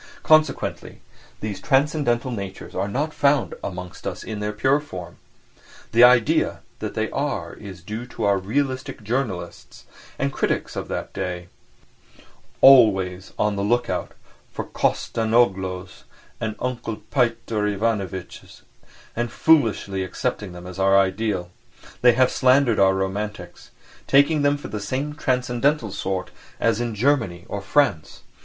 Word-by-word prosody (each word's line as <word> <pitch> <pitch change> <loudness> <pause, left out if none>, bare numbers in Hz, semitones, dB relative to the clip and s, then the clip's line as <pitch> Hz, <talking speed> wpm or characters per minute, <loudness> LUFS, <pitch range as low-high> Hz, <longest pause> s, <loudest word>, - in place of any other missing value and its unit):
Consequently 155 0 +2 0.4
these 105 -2 -4
transcendental 135 -3 +1
natures 100 -4 -6
are 95 +2 -1
not 145 +9 -2
found 140 -2 +2
amongst 90 -1 -6
us - - -5
in 110 -2 -5
their 105 0 -2
pure 130 +7 +2
form. 90 - -9 0.7
The 120 +2 +6
idea 125 -2 +4 0.2
that - - -5
they - - -1
are - - -2
is 95 -4 -11
due 110 +5 -6
to - - -6
our 100 -1 +3
"realistic" 130 +3 -2
journalists 105 -7 -4 0.3
and 140 0 -1
critics - - -1
of - - -4
that - - -5
day, 90 -2 -4 1.1
always 95 -8 +5
on 105 -1 +1
the 100 - -2
look 120 +3 +1
out - - -3 0.4
for - - -5
Kostanzhoglos 95 -5 0 0.3
and 110 -1 -3
Uncle 120 -3 -3 0.2
Pyotr 115 -4 0
Ivanitchs 100 -3 -3 0.5
and 120 0 -2
foolishly 110 - +2
accepting 95 +1 -3
them 90 0 -10
as 90 +1 -8
our 95 0 +4
ideal; 95 -2 0 0.5
they 125 -1 +6
have 130 +2 +3
slandered 130 -2 +3
our 95 -1 +5
romantics, 100 +2 -4 0.4
taking 145 +2 +4
them 145 0 +2
for 145 - -9
the 105 - -4
same 135 +8 -3
transcendental 125 -2 0
sort 95 -1 -3 0.3
as 115 0 +1
in 120 -2 -3
Germany 110 -8 +1
or 100 - -4
France. 100 - 0
110 Hz, 135 wpm, -23 LUFS, 95-130 Hz, 1.1 s, The